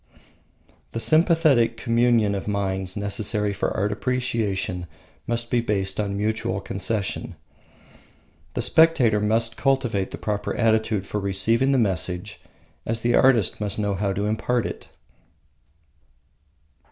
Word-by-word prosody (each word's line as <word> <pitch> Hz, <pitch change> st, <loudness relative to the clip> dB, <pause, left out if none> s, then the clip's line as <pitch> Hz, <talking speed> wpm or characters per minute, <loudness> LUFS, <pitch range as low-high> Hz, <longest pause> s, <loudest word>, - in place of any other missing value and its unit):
The 115 Hz, -, -2 dB
sympathetic 155 Hz, -6 st, +3 dB
communion 115 Hz, -3 st, +2 dB
of 100 Hz, 0 st, -4 dB
minds 95 Hz, -1 st, -2 dB
necessary 105 Hz, 0 st, -1 dB
for 100 Hz, -, -1 dB
art 100 Hz, +2 st, 0 dB
appreciation 105 Hz, -7 st, -2 dB, 0.4 s
must 115 Hz, 0 st, -2 dB
be 120 Hz, -, +2 dB
based 100 Hz, -4 st, -1 dB
on 100 Hz, -1 st, -1 dB
mutual 105 Hz, -2 st, -1 dB
concession. 100 Hz, +1 st, -3 dB, 1.2 s
The -, -, -1 dB
spectator 140 Hz, -10 st, +4 dB
must 110 Hz, +2 st, 0 dB
cultivate 125 Hz, -8 st, 0 dB
the -, -, -7 dB
proper 105 Hz, -1 st, -3 dB
attitude 110 Hz, -3 st, +1 dB
for 105 Hz, -, -3 dB
receiving 105 Hz, +7 st, +1 dB
the 135 Hz, -, +3 dB
message, 95 Hz, -1 st, -2 dB, 0.4 s
as 115 Hz, 0 st, -2 dB
the 120 Hz, +1 st, +1 dB
artist 120 Hz, -7 st, +3 dB
must 105 Hz, 0 st, -3 dB
know 105 Hz, -1 st, 0 dB
how 100 Hz, +1 st, -1 dB
to 100 Hz, +2 st, -2 dB
impart 110 Hz, +2 st, 0 dB
it. -, -, -6 dB
110 Hz, 125 wpm, -24 LUFS, 100-120 Hz, 1.2 s, spectator